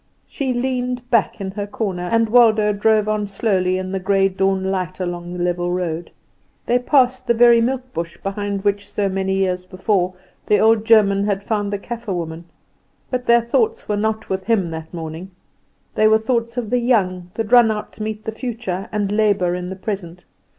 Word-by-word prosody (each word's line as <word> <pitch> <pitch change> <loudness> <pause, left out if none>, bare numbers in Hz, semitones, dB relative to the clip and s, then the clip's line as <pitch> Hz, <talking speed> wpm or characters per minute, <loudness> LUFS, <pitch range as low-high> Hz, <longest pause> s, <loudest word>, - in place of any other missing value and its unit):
She 275 -3 -3
leaned 250 0 -2
back 230 -4 +2
in 190 -1 -4
her 205 +1 -4
corner, 185 -4 -3
and 230 0 +3
Waldo 215 -2 +4
drove 215 +1 +2
on 215 -1 -1
slowly 190 -3 0
in 185 0 -4
the 195 - -2
grey 195 +1 +2
dawn 190 0 0
light 185 -1 -3
along 175 -1 -4
the 180 0 -3
level 175 0 -1
road. 175 -2 -3 0.6
They 245 +1 +2
passed 255 -1 +2
the 235 - +3
very 235 0 +6
milk 255 +1 -2
bush 170 0 -5
behind 200 0 -4
which 200 0 -1
so 205 -1 -1
many 190 0 -1
years 185 -1 0
before 185 0 -1 0.3
the 210 - +4
old 220 0 +3
German 205 -3 +4
had 200 -1 -1
found 205 -1 -1
the 205 - -1
Kaffer 230 0 -5
woman. 165 -1 -5 0.7
But 250 -1 -2
their 235 0 +5
thoughts 450 - 0
were 210 - 0
not 220 +1 -1
with 190 0 -2
him 200 -7 +1
that 160 0 -7
morning: 165 +2 -7 0.6
they 215 - +4
were 220 0 +5
the 220 - -11
thoughts 235 0 -1
of 230 -4 -3
the 250 - +3
young, 185 -8 +1
that 225 -1 -3
run 240 -2 +7
out 215 -1 -4
to - - -11
meet 215 0 -4
the 220 - -2
future, 220 -5 -5
and 205 -2 -1
labour 205 -4 +2
in 180 0 -4
the 190 - -5
present. 185 -3 -6
205 Hz, 200 wpm, -20 LUFS, 185-230 Hz, 0.7 s, run